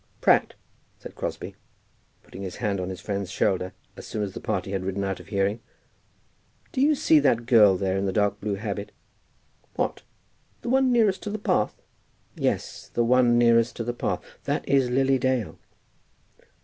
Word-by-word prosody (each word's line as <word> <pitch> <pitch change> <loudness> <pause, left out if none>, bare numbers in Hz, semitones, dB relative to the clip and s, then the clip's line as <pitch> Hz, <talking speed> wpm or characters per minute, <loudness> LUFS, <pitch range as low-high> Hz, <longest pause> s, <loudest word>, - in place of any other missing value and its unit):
"Pratt," - - +3 0.4
said - - -11
Crosbie, - - -5 0.7
putting 95 - -11
his 95 -2 -5
hand 105 -5 -1
on 90 0 -3
his 95 - -6
friend's 100 -2 -4
shoulder 95 -2 0 0.2
as - - -10
soon 105 - -3
as 100 -2 -4
the - - -6
party 95 0 -3
had 95 -1 -2
ridden 95 +1 -2
out 95 -1 -2
of - - -13
hearing, 100 +2 0 1.1
"do 260 - -1
you 300 +2 +4
see 160 - +4
that 125 -5 +2
girl 105 -6 +6
there 95 0 -1
in 100 0 -1
the - - 0
dark 105 +1 0
blue 105 -1 -1
habit?" 100 0 -5 0.8
"What, - - -2 0.6
the - - -3
one 265 0 +3
nearest 215 -6 +3
to - - -5
the 210 - -3
path?" 105 - 0 0.6
"Yes; - - -2
the 120 - +1
one 120 0 +4
nearest 115 0 +4
to 115 - -3
the 120 +1 -3
path. 120 - -2 0.2
That - - -2
is 135 -2 +3
Lily 135 +1 +2
Dale." 130 -4 -1
110 Hz, 175 wpm, -25 LUFS, 100-130 Hz, 1.1 s, girl